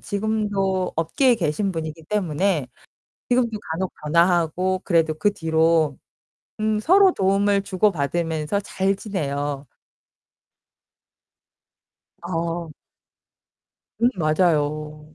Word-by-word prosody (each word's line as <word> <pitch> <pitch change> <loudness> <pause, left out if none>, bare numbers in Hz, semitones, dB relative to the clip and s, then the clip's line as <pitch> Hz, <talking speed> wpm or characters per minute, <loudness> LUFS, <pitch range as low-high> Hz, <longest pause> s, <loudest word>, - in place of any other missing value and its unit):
지금도 200 -3 -1
업계에 240 - +2
계신 190 +1 -1
분이기 160 -1 -6
때문에 180 -5 0 0.6
지금도 240 -3 +1
간혹 185 +3 -2
전화하고 175 +3 +2
그래도 165 -3 +2
그 205 +7 +1
뒤로 160 -4 +2 0.6
음 215 0 +1
서로 375 - +5
도움을 200 +1 +2
주고 195 +1 +1
받으면서 160 +2 -1
잘 195 0 -1
지내요. 145 - -4 2.6
어. 170 -1 -3 1.3
음 240 - +6
맞아요. 155 -2 0
175 Hz, 200 characters per minute, -22 LUFS, 155-200 Hz, 2.6 s, 음